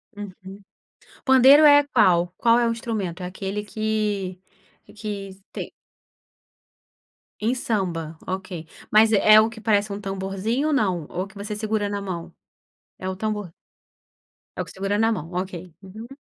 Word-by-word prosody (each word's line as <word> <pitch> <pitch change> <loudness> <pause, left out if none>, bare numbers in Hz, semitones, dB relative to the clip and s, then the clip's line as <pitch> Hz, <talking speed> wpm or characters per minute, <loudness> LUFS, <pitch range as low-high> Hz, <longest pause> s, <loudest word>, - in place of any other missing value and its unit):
Uhum. 200 -1 -10 0.6
Pandeiro 265 +3 +7
é 290 -1 +8
qual, 175 -6 +4
qual 230 0 +4
é 235 - +2
o - - +1
instrumento? 210 -6 -4
É 180 - -3
aquele 195 +3 -4
que 210 -3 -2 0.6
que 205 -2 -5 0.2
tem - - -6 1.7
Em 230 +4 0
samba, 175 -9 -2
ok, 185 -4 -5 0.2
mas 215 +1 +6
é 215 0 +7
o 220 - +1
que 225 0 -11
parece 210 -1 +1
um 200 - -4
tamborzinho 195 +7 -2
ou - - +1
não? 185 - 0
Ou 185 +2 -4
que 195 - -20
você 205 +1 -5
segura 210 -1 -1
na 200 0 -3
mão? 180 -4 -6 0.7
É 185 - -5
o 190 - -4
tambor 210 -3 -3 1.1
É - - -6
o - - -4
que - - -12
segura 195 +2 -1
na 225 +1 +3
mão, 165 - -6
ok 190 0 -8 0.3
Uhum. 215 +5 -10
205 Hz, 155 wpm, -23 LUFS, 190-220 Hz, 1.7 s, é